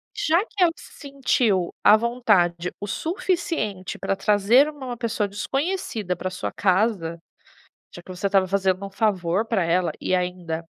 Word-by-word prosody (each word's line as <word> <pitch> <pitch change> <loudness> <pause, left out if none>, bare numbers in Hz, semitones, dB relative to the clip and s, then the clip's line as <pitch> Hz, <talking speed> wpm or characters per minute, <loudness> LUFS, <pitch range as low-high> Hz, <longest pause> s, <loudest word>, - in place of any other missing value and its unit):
Já 370 -2 +2
que 400 -5 0
ela 340 - +4
se - - -15 0.2
sentiu 235 -9 +1
à 210 - +8
vontade 200 -8 +1
o 205 - -5
suficiente 320 - -2
para 195 - -1
trazer 210 +7 +4
uma 290 -4 -9
uma 240 -1 -5
pessoa 230 -3 -1
desconhecida 225 - -2
para 180 - -5
a - - -14
sua 185 - -4
casa, 185 -4 0 0.8
já 175 - -10
que - - -22
você 185 +2 -3
estava 195 -1 +2
fazendo 190 0 0
um - - -10
favor 195 -2 0
pra 220 -5 0
ela, 170 -1 +1
e - - 0
ainda 180 -2 -2
200 Hz, 165 wpm, -23 LUFS, 180-245 Hz, 0.8 s, à